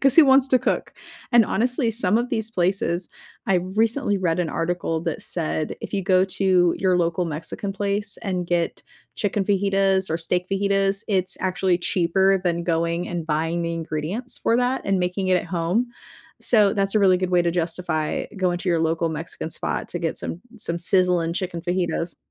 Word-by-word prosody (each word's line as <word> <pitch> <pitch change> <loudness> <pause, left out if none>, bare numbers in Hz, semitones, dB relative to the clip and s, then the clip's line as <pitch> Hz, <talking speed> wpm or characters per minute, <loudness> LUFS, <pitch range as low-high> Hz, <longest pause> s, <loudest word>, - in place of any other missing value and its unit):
'Cause 275 +1 +4
who 325 - +9
wants 270 0 +5
to 255 - +4
cook? - - -1 0.4
And 235 -2 +6
honestly, 245 +1 +1
some 210 -1 +2
of 245 +1 -2
these 220 -3 -2
places 180 -2 0 0.4
I 195 - +2
recently 210 +4 0
read 180 -1 0
an 170 - -1
article 165 -1 -2
that 165 -2 -3
said, 155 -2 -2
if - - -7
you 195 - 0
go 185 0 +4
to 185 -2 +2
your 185 -1 +2
local 170 +1 0
Mexican 165 +5 -4
place, 205 +1 -2
and 185 -2 -2
get 170 -1 -1 0.3
chicken 205 -1 -1
fajitas, 195 -2 +1
or 160 - +1
steak 180 +2 -1
fajitas, 195 0 +1
it's 185 -3 0
actually 185 -1 +1
cheaper 190 +2 +2
than 170 -1 -1
going 170 +1 0
and 175 -2 -4
buying 165 +2 -1
the 170 0 -2
ingredients 165 +9 -4
for 230 - +2
that 250 +1 0
and 195 -1 +1
making 180 +1 -1
it 185 - +4
at - - -9
home. 180 +7 0 0.5
So, 210 -4 +4
that's 195 0 0
a 215 - +5
really 190 -2 +5
good 185 -1 -2
way 180 - +4
to 170 - +1
justify 165 -2 -2
going 180 -2 0
to 180 - -4
your 170 -2 +2
local 165 +1 0
Mexican 160 0 -5
spot - - -3
to 175 - -4
get 165 -2 -2
some 170 - -5 0.2
some 170 -4 -2
sizzling 175 -2 +1
chicken 175 -2 -3
fajitas. 175 -1 -2
185 Hz, 190 wpm, -23 LUFS, 170-200 Hz, 0.5 s, who